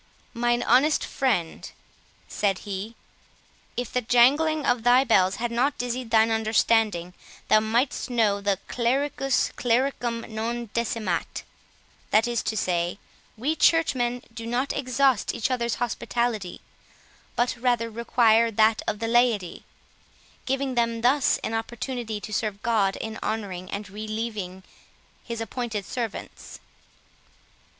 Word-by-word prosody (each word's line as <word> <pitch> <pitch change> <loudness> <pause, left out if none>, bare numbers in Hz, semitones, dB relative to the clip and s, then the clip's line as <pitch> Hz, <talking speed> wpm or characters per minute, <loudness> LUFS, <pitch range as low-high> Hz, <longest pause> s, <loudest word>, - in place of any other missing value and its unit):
"Mine 240 +1 +1
honest 270 +6 +3
friend," 200 -12 -1 0.6
said 195 -2 0
he, 205 +3 -5 0.8
"if 245 -2 -3
the 250 - +1
jangling 285 +7 +3
of 245 -1 +2
thy 245 +3 +5
bells 190 -7 +3
had 240 +2 -3
not 260 +5 +1
dizzied 245 0 -3
thine 225 0 +4
understanding, 220 -5 +1 0.4
thou 215 - +6
mightst 230 +6 0
know 215 -5 +2 0.3
"Clericus 270 +2 0
clericum 240 -1 0
non 230 +1 -4
decimat"; 220 -6 -2 0.7
that 220 +2 +3
is 240 -1 0
to 220 - -3
say, 175 -1 0 0.4
we 285 +8 0
churchmen 250 -8 +2
do 230 0 -7
not 250 +4 -1
exhaust 260 -3 +1
each 230 - -1
other's 235 -2 0
hospitality, 235 -4 -2 0.7
but 240 +1 +1
rather 240 -2 0
require 230 0 +3
that 220 0 +3
of 210 - -1
the 225 +2 -3
laity, 230 -7 +1 0.8
giving 270 0 -1
them 230 -1 0
thus 260 +3 +3
an 225 - -2
opportunity 225 0 -4
to 215 - -8
serve 210 -1 -2
God 210 -4 +2
in 220 0 -6
honouring 195 -4 -4
and 200 0 -5
relieving 215 -2 -5 0.6
his 235 -1 -5
appointed 225 -2 -4
servants." 230 -4 -6
230 Hz, 125 wpm, -25 LUFS, 215-245 Hz, 0.8 s, thou